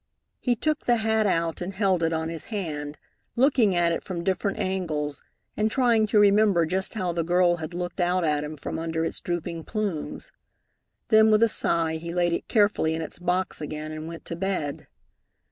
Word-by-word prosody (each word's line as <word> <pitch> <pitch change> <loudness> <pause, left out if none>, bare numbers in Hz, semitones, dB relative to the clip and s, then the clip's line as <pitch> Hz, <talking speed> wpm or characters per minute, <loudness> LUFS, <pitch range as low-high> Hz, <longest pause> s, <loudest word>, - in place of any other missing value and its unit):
He 245 -2 +1
took 305 +6 -1
the 240 - +5
hat 220 -1 +1
out 165 -3 0
and 185 +2 -4
held 190 -3 +2
it 165 0 +1
on 160 0 -1
his 165 -2 -6
hand, 150 -8 -4 0.4
looking 240 -6 +3
at 170 -1 +3
it 165 - -2
from 175 -3 -5
different 195 +2 -1
angles 155 -6 -2 0.3
and 215 +1 +1
trying 230 -3 +3
to 215 - +1
remember 205 -4 +5
just 190 +6 -2
how 185 -5 -1
the 170 0 -1
girl 175 +1 +3
had 160 +1 -6
looked 175 +1 -4
out 180 +1 +1
at 150 -2 +1
him 150 +1 -6
from 145 - -5
under 165 0 -2
its - - -4
drooping 170 -1 -3
plumes. 205 -8 -4 0.8
Then 220 -1 +6
with 215 +1 +5
a - - +6
sigh 165 -6 +1
he 170 +1 -6
laid 175 -1 +2
it - - -3
carefully 205 -7 +2
in 160 - -3
its 160 - -8
box 180 -1 -1
again 155 +1 -5
and 155 0 -6
went 165 0 -9
to 170 - -3
bed. 175 -6 -3
175 Hz, 195 wpm, -26 LUFS, 160-205 Hz, 0.8 s, Then